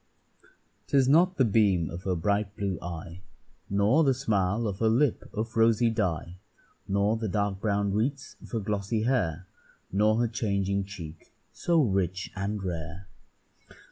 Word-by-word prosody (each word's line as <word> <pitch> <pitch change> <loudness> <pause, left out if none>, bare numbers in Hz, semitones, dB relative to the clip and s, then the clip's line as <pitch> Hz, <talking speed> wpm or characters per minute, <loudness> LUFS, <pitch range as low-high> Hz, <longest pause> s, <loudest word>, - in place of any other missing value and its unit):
'Tis 135 -2 +3
not 175 +6 +4
the 130 - +4
beam 100 -6 +3
of 85 +2 -8
her 95 -2 +1
bright 100 +4 0
blue 100 -5 -2
eye, 85 0 -7 0.5
Nor 105 +10 +3
the 135 -3 +3
smile 110 -3 0
of 100 -2 -4
her 110 - +3
lip 125 +3 +1
of 110 0 -4
rosy 115 +1 +4
dye, 90 -5 -2 0.5
Nor 100 +3 +1
the 110 -1 -3
dark 100 -1 -1
brown 100 -1 0
wreaths 135 +7 -2
of - - -12
her 115 - -2
glossy 105 +1 -1
hair, 95 - 0 0.5
Nor 105 +3 +3
her 120 - +2
changing 100 -3 -1
cheek, 85 -5 -10 0.2
so 170 -1 +1
rich 95 -4 -1
and 100 +1 -3
rare. 85 +1 -5
100 Hz, 150 wpm, -28 LUFS, 95-115 Hz, 0.5 s, not